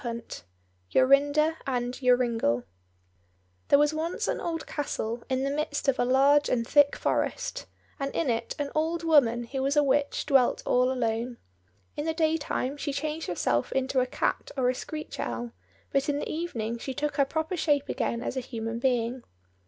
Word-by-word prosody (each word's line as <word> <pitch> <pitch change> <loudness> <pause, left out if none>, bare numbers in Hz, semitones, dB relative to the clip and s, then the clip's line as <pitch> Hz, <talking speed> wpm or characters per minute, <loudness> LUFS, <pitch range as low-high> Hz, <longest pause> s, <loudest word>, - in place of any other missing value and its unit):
69 235 -3 -5 0.6
Jorinda 285 - +4
and 245 -2 -1
Joringel 240 - +2 1.0
There - - +6
was 295 +1 +3
once 320 +2 -2
an - - -1
old 330 -2 -3
castle 235 -5 -3
in 260 0 0
the 275 - 0
midst 290 0 -2
of 270 -1 +2
a 245 - +3
large 280 +3 +4
and 230 -2 +1
thick 290 0 +5
forest, - - -2 0.3
and 275 0 -2
in 330 - 0
it 230 -2 -1
an 290 -1 -3
old 325 +2 0
woman 255 -8 +4
who 265 +3 -4
was 275 +2 0
a 295 - +6
witch 285 +1 +1
dwelt 270 -4 +3
all 250 +1 +3
alone. 235 -1 -1 0.6
In 295 - -3
the 320 - 0
day 320 -1 +2
time 285 -2 -3
she 285 - -3
changed 305 +3 -3
herself 120 -8 0
into 265 0 +1
a 255 - +1
cat - - -1
or 250 -2 +2
a - - +2
screech 305 +4 -7
owl, 240 -1 -3 0.4
but 275 +1 +1
in 285 - +1
the - - -3
evening 235 -9 -3
she 265 +2 -5
took 295 +1 -2
her 280 - +5
proper 315 +5 -2
shape 290 -4 +1
again 235 +1 -2
as - - -3
a - - 0
human 230 -2 -5
being. 245 0 0
275 Hz, 185 wpm, -27 LUFS, 245-295 Hz, 1.0 s, There